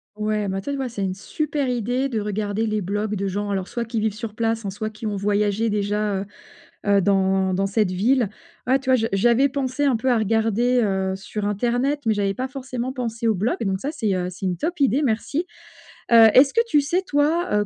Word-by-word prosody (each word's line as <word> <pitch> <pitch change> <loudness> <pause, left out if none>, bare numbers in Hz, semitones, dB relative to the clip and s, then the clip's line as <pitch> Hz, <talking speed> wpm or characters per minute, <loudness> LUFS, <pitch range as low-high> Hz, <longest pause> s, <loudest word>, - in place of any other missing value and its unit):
Ouais, 210 -1 -1
ben 195 0 -2
tu 195 - -7
vois, 270 -1 -2
ouais, - - -4
c'est 210 -4 -4
une 185 -1 -2
super 290 +6 -2
idée 245 +2 0
de 230 -5 -2
regarder 210 +1 -2
les 215 -1 -1
blogs 205 +3 -2
de 200 0 -2
gens, 205 +2 -3
alors 190 -2 -2
soit 235 - -3
qui 230 0 -3
vivent 215 -1 0
sur 215 0 -7
place, 225 0 -1
hein, 200 - -3
soit 215 +3 -4
qui 220 +1 -6
ont 205 - -2
voyagé 205 +2 0
déjà, 205 0 0
heu, 195 - -4 0.6
heu, 200 -1 +4
dans 190 -1 +2
dans 195 +1 +1
cette 200 0 +1
ville. 225 +5 +2 0.4
Voilà, 260 +1 +4
tu 265 -1 -2
vois, - - +6
je 225 -2 0
j'avais 240 +7 +3
pensé 275 +1 -1
un 270 -3 +3
peu 255 +3 +1
à 240 - +3
regarder, 225 +3 +2
heu, 190 -2 0
sur 205 +2 -5
internet, 245 +7 0
mais 220 - +3
j'avais 200 -1 -1
pas 255 +2 -2
forcément 255 -1 -5
pensé 230 -3 -3
aux 225 - +4
blogs. 210 +5 -1
Donc 190 -1 -1
ça, 275 - -3
c'est, 220 -10 -1
heu, 180 -1 -1
c'est 185 +1 -7
une 180 -2 -1
top 335 - -3
idée, 270 +1 +3
merci! 280 +6 -1 0.6
Heu, 230 -1 +9
est-ce 270 +2 +6
que 465 - +4
tu 295 -10 +3
sais, 345 +7 0
toi, 315 +3 +1
heu, 205 - -2
220 Hz, 235 wpm, -23 LUFS, 200-255 Hz, 0.6 s, Heu